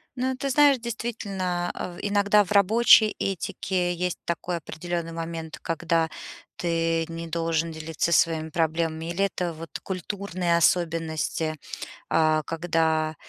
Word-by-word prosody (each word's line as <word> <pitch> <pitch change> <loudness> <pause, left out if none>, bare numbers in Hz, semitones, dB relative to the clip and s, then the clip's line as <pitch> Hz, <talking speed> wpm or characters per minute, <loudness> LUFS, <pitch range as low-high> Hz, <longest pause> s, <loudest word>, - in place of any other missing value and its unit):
Ну, 260 +1 -1
ты 275 +2 -3
знаешь, 285 -1 +5
действительно, 200 -6 -3
э, 180 - -5
в - - -10
иногда 205 0 +3
в 190 - -11
рабочей 215 +2 +6
этике 180 -1 -1
есть 180 0 -2
такой 170 +1 -2
определённый 170 +1 -4
момент, 165 -1 -6
когда 165 0 0 0.5
ты 165 -1 +1
не 165 0 -6
должен 165 0 -1
делиться 160 +1 -2
своими 160 -1 +2
проблемами, 160 0 -1
или 195 +3 +1
это 180 -3 -2
вот 165 +1 -9
культурные 185 -2 -1
особенности, 165 -2 +1 0.6
а, 155 -1 +3
когда, 160 -1 0
170 Hz, 125 wpm, -26 LUFS, 165-190 Hz, 0.6 s, рабочей